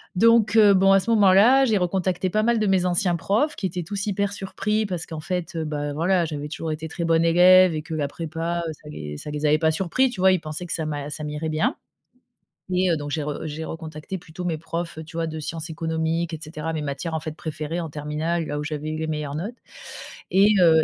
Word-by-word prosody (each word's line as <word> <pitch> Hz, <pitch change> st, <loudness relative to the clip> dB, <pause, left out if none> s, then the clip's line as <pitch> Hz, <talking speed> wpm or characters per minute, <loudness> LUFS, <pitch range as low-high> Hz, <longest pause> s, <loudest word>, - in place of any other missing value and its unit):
donc 225 Hz, +1 st, +4 dB
heu, 210 Hz, -2 st, +7 dB
bon 195 Hz, 0 st, +5 dB
à 195 Hz, -, +6 dB
ce 210 Hz, -, -5 dB
moment-là, 220 Hz, +6 st, +6 dB
j'ai 220 Hz, -4 st, +2 dB
recontacté 185 Hz, 0 st, 0 dB
pas 215 Hz, -, +2 dB
mal 235 Hz, +2 st, +2 dB
de 215 Hz, -, +1 dB
mes 190 Hz, -2 st, +2 dB
anciens 180 Hz, 0 st, +2 dB
profs 215 Hz, -, 0 dB
qui 195 Hz, -, -2 dB
étaient 180 Hz, 0 st, -4 dB
tous 200 Hz, +4 st, -4 dB
hyper 200 Hz, 0 st, 0 dB
surpris 210 Hz, +2 st, -1 dB
parce 180 Hz, -4 st, -4 dB
qu'en 160 Hz, -2 st, -7 dB
fait, 175 Hz, +2 st, -4 dB
heu, 160 Hz, -1 st, -2 dB
bah, 145 Hz, -1 st, -3 dB
voilà 175 Hz, +3 st, +2 dB
j'avais 150 Hz, -2 st, -5 dB
toujours 160 Hz, +1 st, -4 dB
été 155 Hz, +1 st, -4 dB
très 170 Hz, +2 st, -5 dB
bonne 165 Hz, 0 st, +3 dB
élève 180 Hz, +1 st, +6 dB
et 155 Hz, -, -3 dB
que 160 Hz, -, -7 dB
la 150 Hz, -2 st, -1 dB
prépa, 165 Hz, +3 st, -3 dB
heu, -, -, -3 dB
ça 150 Hz, 0 st, -14 dB
les 75 Hz, -, -7 dB
ça 150 Hz, -, -7 dB
les 150 Hz, +1 st, -3 dB
avait 150 Hz, +1 st, +4 dB
pas 160 Hz, -1 st, +3 dB
surpris, 190 Hz, +11 st, +1 dB
tu 240 Hz, -6 st, -8 dB
vois? 190 Hz, +1 st, +6 dB
Ils 185 Hz, -, +2 dB
pensaient 155 Hz, +3 st, -6 dB
que 170 Hz, -, -4 dB
ça 160 Hz, -, -2 dB
m'a 145 Hz, -1 st, -4 dB
ça 155 Hz, -, -5 dB
m'irait 150 Hz, +1 st, -3 dB
bien 155 Hz, -, 0 dB, 1.0 s
et 185 Hz, 0 st, +2 dB
heu, -, -, +3 dB
donc 145 Hz, -1 st, -5 dB
j'ai 155 Hz, 0 st, -1 dB
re 145 Hz, 0 st, -4 dB
j'ai 155 Hz, +1 st, -5 dB
recontacté 160 Hz, +2 st, -6 dB
plutôt 175 Hz, 0 st, -8 dB
mes 165 Hz, -3 st, -1 dB
profs, 165 Hz, +1 st, -5 dB
heu, -, -, -6 dB
tu 160 Hz, +1 st, -10 dB
vois, 165 Hz, -1 st, 0 dB
de 160 Hz, 0 st, -5 dB
sciences 160 Hz, +2 st, -5 dB
économiques 160 Hz, +1 st, -2 dB
et 160 Hz, -, -4 dB
cetera, 155 Hz, +1 st, -5 dB
mes 160 Hz, -1 st, -3 dB
matières 150 Hz, +3 st, -4 dB
en 160 Hz, -, 0 dB
fait 155 Hz, 0 st, -6 dB
préférées 160 Hz, +1 st, -4 dB
en 165 Hz, -, -5 dB
terminale. 155 Hz, +3 st, -2 dB
Là 145 Hz, -, -3 dB
où 150 Hz, -, -3 dB
j'avais 150 Hz, 0 st, -4 dB
eu 155 Hz, -, -3 dB
les 160 Hz, 0 st, -3 dB
meilleures 150 Hz, -2 st, -3 dB
notes 205 Hz, +10 st, -5 dB, 0.7 s
et 200 Hz, +3 st, +5 dB
heu, 160 Hz, -3 st, +6 dB
165 Hz, 250 wpm, -24 LUFS, 155-185 Hz, 1.0 s, heu